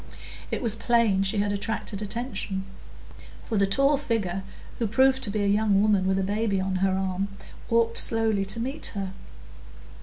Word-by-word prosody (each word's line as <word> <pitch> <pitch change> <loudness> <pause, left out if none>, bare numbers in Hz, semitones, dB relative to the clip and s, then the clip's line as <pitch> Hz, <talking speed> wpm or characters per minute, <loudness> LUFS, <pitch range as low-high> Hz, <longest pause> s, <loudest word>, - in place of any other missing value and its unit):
It - - -3
was 230 -3 +3
plain 230 -5 +2
she 195 +2 0
had 205 0 +1
attracted 205 0 -3
attention; 210 -3 -3 0.8
for 225 - -3
the 200 - +3
tall 275 +8 +3
figure, 215 -9 -2 0.4
who 230 - +1
proved 265 +4 +3
to 215 - +2
be 205 0 -1
a - - +1
young 205 -1 +3
woman 200 -2 +3
with 190 0 +2
a 195 - 0
baby 205 0 0
on 190 0 -1
her 190 0 +1
arm, 190 0 -1 0.4
walked 230 0 +3
slowly 220 -3 +2
to 195 +4 0
meet 265 +5 -4
her. 195 -2 -3
205 Hz, 175 wpm, -26 LUFS, 195-230 Hz, 0.8 s, was